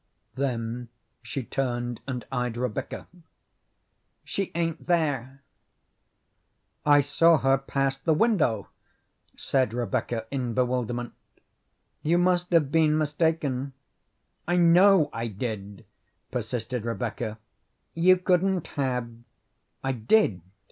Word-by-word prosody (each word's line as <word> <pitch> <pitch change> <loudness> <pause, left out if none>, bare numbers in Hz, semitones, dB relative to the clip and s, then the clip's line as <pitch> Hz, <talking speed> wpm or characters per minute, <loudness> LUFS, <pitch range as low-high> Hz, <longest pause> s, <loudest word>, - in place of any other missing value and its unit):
Then 120 -3 -3 0.3
she 135 - -5
turned 120 -2 -2
and 125 -3 -4
eyed 125 -2 -2
Rebecca. 125 +2 -3 1.2
"She 195 -2 -3
ain't 165 -1 -2
there." 140 -6 0 1.4
"I 145 -1 +6
saw 165 +4 +4
her 135 -1 +3
pass 135 0 -1
the 160 +2 +2
window," 150 - +2 0.7
said 130 -4 0
Rebecca 115 0 -2
in 125 -4 -2
bewilderment. 120 -1 -1 0.9
"You 165 +3 +2
must 180 0 +2
have 155 -5 +3
been 155 -1 +3
mistaken." 150 -3 0 0.7
"I 175 +1 +2
know 175 0 +6
I 115 0 -3
did," 105 -2 -6 0.5
persisted 120 0 -3
Rebecca. 115 -1 -3 0.6
"You 185 +3 +5
couldn't 185 0 +1
have." 125 -4 -1 0.8
"I 135 - 0
did. 115 - +2
135 Hz, 100 wpm, -26 LUFS, 120-165 Hz, 1.4 s, I